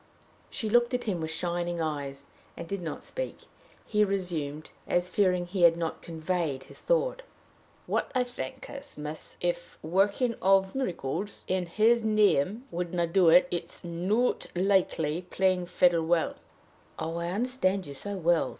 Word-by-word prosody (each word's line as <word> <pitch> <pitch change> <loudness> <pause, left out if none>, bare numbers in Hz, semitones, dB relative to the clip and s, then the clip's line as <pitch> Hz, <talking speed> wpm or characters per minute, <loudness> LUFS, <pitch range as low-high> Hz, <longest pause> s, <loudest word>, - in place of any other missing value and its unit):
She 220 - -3
looked 240 +3 +3
at 245 - -2
him 185 -6 -2
with 160 - -2
shining 175 +1 -2
eyes, 140 -3 -3 0.3
and 170 - -6
did 200 +1 -3
not 160 -3 -5
speak. - - -5 0.4
He 210 -1 +3
resumed, 170 -7 -2 0.2
as 175 +1 +1
fearing 180 -3 +2
he 180 +1 -3
had 170 -1 +7
not 165 -1 -3
conveyed 160 -4 -2
his - - -14
thought. - - +1 0.6
"What - - -1
I 255 - +4
think 260 +2 -7
I - - -9
mean 280 - -5
is, 280 +1 -14
miss, 150 +1 -6
that, 175 - -2
if 175 0 -3
the - - -9
working 205 +6 +2
of 190 0 +4
miracles 200 - -3
in 185 -1 0
his 225 +6 +3
name 215 - +3
wouldn't 170 -1 -2
do 185 -4 +6
it, 265 +10 +7
it's 170 -1 -5
not 185 +8 0
likely 175 -4 +2
playing 185 -1 +2
the - - -17
fiddle 175 -2 +3
will." 170 -1 +2 0.6
"Oh, 165 +1 -3
I 170 0 -2
understand 200 -3 0
you 140 - -7
so 205 +8 -4
well!" 170 -2 +2
180 Hz, 170 wpm, -29 LUFS, 165-210 Hz, 0.6 s, had